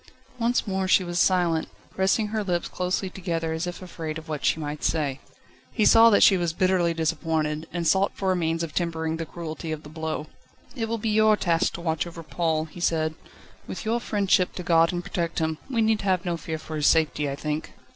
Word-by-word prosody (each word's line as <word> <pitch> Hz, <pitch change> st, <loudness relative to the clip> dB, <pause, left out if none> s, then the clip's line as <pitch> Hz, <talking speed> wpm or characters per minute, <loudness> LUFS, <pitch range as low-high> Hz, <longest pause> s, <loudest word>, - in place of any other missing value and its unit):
Once 240 Hz, +1 st, +1 dB
more 190 Hz, -2 st, -1 dB
she 185 Hz, -, +4 dB
was 175 Hz, 0 st, -2 dB
silent, 175 Hz, -4 st, +2 dB, 0.2 s
pressing 195 Hz, +3 st, +1 dB
her 215 Hz, 0 st, -1 dB
lips 175 Hz, -3 st, -1 dB
closely 185 Hz, +1 st, -2 dB
together, 170 Hz, -3 st, -3 dB
as 160 Hz, +2 st, -2 dB
if 175 Hz, +1 st, -6 dB
afraid 160 Hz, -3 st, -5 dB
of 160 Hz, -, -10 dB
what 150 Hz, -2 st, -4 dB
she -, -, +2 dB
might 150 Hz, -1 st, -5 dB
say. 145 Hz, -4 st, 0 dB, 0.5 s
He 215 Hz, -, +1 dB
saw 225 Hz, 0 st, +8 dB
that 205 Hz, -, +5 dB
she 195 Hz, -, +7 dB
was 170 Hz, -2 st, -1 dB
bitterly 185 Hz, -1 st, +2 dB
disappointed, 160 Hz, -1 st, -1 dB
and 170 Hz, -1 st, -3 dB
sought 190 Hz, +4 st, +3 dB
for 190 Hz, -1 st, 0 dB
a -, -, +2 dB
means 165 Hz, -1 st, 0 dB
of 165 Hz, -, -5 dB
tempering 160 Hz, -2 st, -1 dB
the 165 Hz, -1 st, -5 dB
cruelty 165 Hz, -1 st, -6 dB
of 155 Hz, 0 st, -5 dB
the 150 Hz, -, -11 dB
blow. 160 Hz, -1 st, -4 dB, 0.5 s
"It 225 Hz, -4 st, -3 dB
will 230 Hz, -, -1 dB
be 225 Hz, 0 st, -2 dB
your 215 Hz, 0 st, +4 dB
task 170 Hz, -4 st, +1 dB
to -, -, -6 dB
watch 160 Hz, 0 st, -1 dB
over 165 Hz, -1 st, -9 dB
Paul," 160 Hz, -1 st, -1 dB
he 160 Hz, +2 st, -12 dB
said; 160 Hz, -2 st, +1 dB, 0.5 s
"with -, -, -6 dB
your 230 Hz, +2 st, +1 dB
friendship 200 Hz, -5 st, +1 dB
to 180 Hz, -, -5 dB
guard 165 Hz, -1 st, +4 dB
and 175 Hz, 0 st, -3 dB
protect 170 Hz, -1 st, -3 dB
him, 160 Hz, -1 st, -1 dB
we 235 Hz, -4 st, +1 dB
need 220 Hz, -1 st, +2 dB
have 185 Hz, -2 st, 0 dB
no 175 Hz, -1 st, 0 dB
fear 160 Hz, 0 st, -5 dB
for 155 Hz, 0 st, -7 dB
his 150 Hz, -, +2 dB
safety, 150 Hz, -2 st, +2 dB
I 140 Hz, -, -3 dB
think." 150 Hz, +2 st, -4 dB
170 Hz, 220 wpm, -25 LUFS, 160-190 Hz, 0.5 s, saw